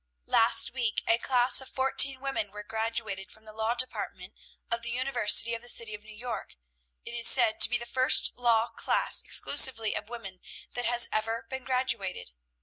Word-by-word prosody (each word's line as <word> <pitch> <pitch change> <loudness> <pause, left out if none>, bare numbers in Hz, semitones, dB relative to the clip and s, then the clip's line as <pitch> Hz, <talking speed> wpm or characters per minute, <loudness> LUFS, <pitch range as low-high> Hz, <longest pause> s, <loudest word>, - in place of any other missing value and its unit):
Last 230 +1 +5
week 240 -5 -3
a 230 - +1
class 250 +1 +3
of 265 - -9
fourteen 265 0 +1
women 270 -6 -4
were 210 +1 -11
graduated 220 -3 -5
from 220 0 -16
the 215 - -14
law 220 +2 -3
department 255 +1 -6 0.4
of 235 0 -2
the 240 - -5
University 240 -3 +1
of 230 - -6
the 240 - -9
City 230 -3 -5
of 210 - -10
New 215 0 -15
York. 240 0 -8 0.5
It - - -7
is 235 -1 +5
said 235 -4 +5
to - - +7
be - - -1
the 235 - -10
first 255 +2 +3
law 235 -2 0
class - - -1
exclusively 235 -6 +2
of 210 - -7
women 195 -6 -11 0.3
that 245 0 -6
has 240 0 +1
ever 225 +2 -4
been 265 -1 -8
graduated. 235 - -4
235 Hz, 185 wpm, -26 LUFS, 220-250 Hz, 0.5 s, to